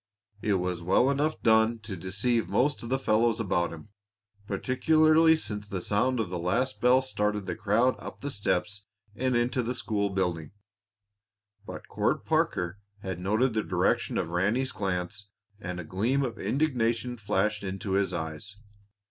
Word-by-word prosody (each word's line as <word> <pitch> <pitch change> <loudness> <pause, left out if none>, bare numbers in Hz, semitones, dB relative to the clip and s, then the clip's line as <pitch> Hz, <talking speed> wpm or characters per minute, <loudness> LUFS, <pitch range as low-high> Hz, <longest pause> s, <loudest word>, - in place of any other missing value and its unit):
It 105 -2 +1
was 90 -2 -2
well 95 +10 +3
enough 150 +3 -1
done 110 +1 +4
to 105 -2 -6
deceive 100 +7 -1
most 145 +3 +1
of 115 - -7
the 135 - +2
fellows 115 -2 +2
about 90 -5 0
him, 85 +6 -10 0.6
particularly 155 +9 +4
since 105 -9 -5
the 95 - -3
sound 120 +7 +1
of 110 - 0
the 90 - -3
last 115 +10 -1
bell 125 +2 +5
started 105 -5 -1
the 90 - -3
crowd 115 +4 +2
up - - -9
the 145 - -3
steps 100 -1 -1 0.3
and 130 0 0
into 125 +2 +1
the 125 +1 -3
school 105 -4 -1
building. 90 -5 -2 1.1
But - - -8
Court - - -1
Parker 90 +3 0 0.2
had 95 -2 -4
noted 110 +7 +1
the 110 - +1
direction - - 0
of - - -1
Ranny's 105 +9 +1
glance, 95 0 -3 0.3
and 90 -3 -5
a - - -4
gleam 115 - 0
of 120 - -6
indignation 125 -4 0
flashed 105 -1 -1
into 95 +1 -4
his 95 -1 +1
eyes. 80 +4 -5
105 Hz, 160 wpm, -28 LUFS, 95-125 Hz, 1.1 s, bell